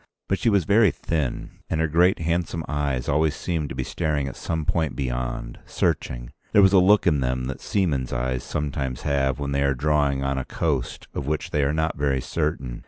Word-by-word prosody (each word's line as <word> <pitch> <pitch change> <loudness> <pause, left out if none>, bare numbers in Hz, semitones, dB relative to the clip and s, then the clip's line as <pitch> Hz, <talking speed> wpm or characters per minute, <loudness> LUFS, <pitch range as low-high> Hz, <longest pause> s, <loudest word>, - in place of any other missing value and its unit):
But 95 - 0
she 115 - +2
was 100 -4 +3
very 105 +4 +5
thin, 75 -6 -3
and 80 - -1
her 80 - +2
great 85 +4 +4
handsome 85 0 -1
eyes 70 -4 -1
always 75 +1 +2
seemed 80 -5 -2
to - - -6
be - - -2
staring 75 -3 -1
at 70 - -6
some 80 -2 -3
point 80 -2 0
beyond, 60 -2 -3
searching. - - -1 0.2
There 105 - +7
was 95 0 +5
a 95 - +7
look 100 +3 +5
in 75 -5 +3
them 65 -1 -1
that 65 +1 -5
seamen's 75 -11 0
eyes 60 +1 -1
sometimes 70 -3 -3
have 70 -3 +1
when 70 -1 -3
they 70 0 +1
are 70 -1 +2
drawing 70 -1 +1
on 70 0 0
a 65 - -4
coast 70 -7 -2
of 70 - -4
which 75 +1 -2
they 75 - +1
are 70 - +2
not 80 -1 -1
very 70 -2 +1
certain. 65 -4 -2
75 Hz, 210 wpm, -24 LUFS, 65-80 Hz, 0.2 s, There